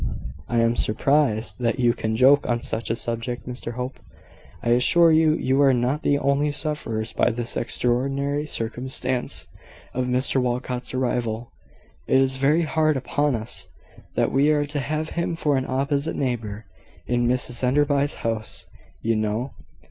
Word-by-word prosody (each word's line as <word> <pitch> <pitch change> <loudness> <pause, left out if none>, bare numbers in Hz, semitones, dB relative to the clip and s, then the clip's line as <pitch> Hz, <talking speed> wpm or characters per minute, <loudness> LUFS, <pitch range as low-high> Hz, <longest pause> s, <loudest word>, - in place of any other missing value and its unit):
"I 120 - -1
am 115 +1 +2
surprised 120 0 +1
that 115 -1 0
you 120 -2 +3
can 110 -2 -2
joke 135 +4 +5
on 120 -1 0
such 115 +1 -2
a 115 - +1
subject, 115 +1 -4
Mr 120 -1 -5
Hope. 125 +2 -5 0.6
I 120 - 0
assure 165 +8 +5
you, 155 -1 +4
you 135 -2 +1
are 135 -2 +5
not 125 +5 0
the 145 - +2
only 140 +1 +1
sufferers 145 -7 -2
by - - +3
this 120 0 -4
extraordinary 135 +5 -1
circumstance 125 +1 -2 0.5
of 125 0 -1
Mr 130 +1 +1
Walcot's 125 0 -2
arrival. 120 -2 -1 0.6
It 130 - +4
is 135 0 +2
very 150 +5 +3
hard 155 -1 +1
upon 145 +1 0
us, 110 +1 -6 0.5
that - - +1
we 140 +3 +3
are 150 -1 +2
to 145 0 -4
have 155 +3 -2
him 170 0 -2
for 150 -3 +1
an 130 -1 -1
opposite 140 +3 0
neighbour 115 -5 -3 0.4
in 120 0 +1
Mrs 125 0 -1
Enderby's 140 +2 +2
house, 115 -1 -3 0.4
you 115 0 +2
know. 110 +4 -1
130 Hz, 155 wpm, -24 LUFS, 120-145 Hz, 0.6 s, joke